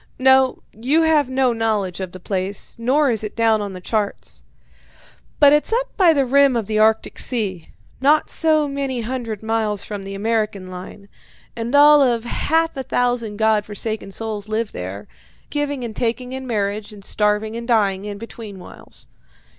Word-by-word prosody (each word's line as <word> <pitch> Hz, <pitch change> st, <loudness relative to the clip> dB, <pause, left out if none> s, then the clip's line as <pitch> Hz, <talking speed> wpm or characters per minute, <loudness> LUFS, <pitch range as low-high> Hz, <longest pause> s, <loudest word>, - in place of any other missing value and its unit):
No, 265 Hz, 0 st, +4 dB
you 270 Hz, +9 st, +1 dB
have 305 Hz, -4 st, +3 dB
no 260 Hz, -1 st, +2 dB
knowledge 215 Hz, -5 st, -1 dB
of 185 Hz, -2 st, -5 dB
the 185 Hz, -, -10 dB
place, 190 Hz, +3 st, -4 dB
nor 265 Hz, +4 st, +2 dB
is 220 Hz, -2 st, -1 dB
it 215 Hz, -, -6 dB
down 225 Hz, -2 st, +2 dB
on 200 Hz, -1 st, -5 dB
the 185 Hz, -, -7 dB
charts. 200 Hz, -, -3 dB, 1.0 s
But 285 Hz, -1 st, +7 dB
it's 300 Hz, +7 st, +1 dB
up -, -, -1 dB
by 360 Hz, -4 st, +5 dB
the 280 Hz, -4 st, +2 dB
rim 275 Hz, 0 st, +4 dB
of 230 Hz, -3 st, -1 dB
the 215 Hz, +1 st, -1 dB
Arctic 220 Hz, 0 st, +2 dB
Sea, 200 Hz, -9 st, -1 dB, 0.3 s
not 295 Hz, +3 st, +3 dB
so 310 Hz, -2 st, +2 dB
many 275 Hz, -3 st, -3 dB
hundred 230 Hz, -3 st, -4 dB
miles 220 Hz, -2 st, -1 dB
from 205 Hz, -2 st, -6 dB
the 195 Hz, 0 st, -7 dB
American 210 Hz, -3 st, -2 dB
line, 185 Hz, +2 st, -10 dB, 0.5 s
and 235 Hz, +3 st, -2 dB
all 295 Hz, 0 st, +7 dB
of 240 Hz, -4 st, +2 dB
half 325 Hz, +6 st, 0 dB
a 270 Hz, -, -3 dB
thousand 245 Hz, -4 st, -1 dB
God 220 Hz, -1 st, +2 dB
forsaken 215 Hz, 0 st, -4 dB
souls 215 Hz, 0 st, -5 dB
live 220 Hz, 0 st, -1 dB
there, 95 Hz, +3 st, -7 dB, 0.4 s
giving 285 Hz, -3 st, -2 dB
and 225 Hz, -3 st, -6 dB
taking 250 Hz, +1 st, -2 dB
in 265 Hz, 0 st, -6 dB
marriage, 210 Hz, -1 st, -2 dB
and 200 Hz, -2 st, -13 dB
starving 210 Hz, +1 st, 0 dB
and 235 Hz, 0 st, -6 dB
dying 205 Hz, -5 st, +1 dB
in 205 Hz, -1 st, -5 dB
between 220 Hz, -2 st, -9 dB
whiles. 180 Hz, -, -12 dB
225 Hz, 175 wpm, -20 LUFS, 205-265 Hz, 1.0 s, But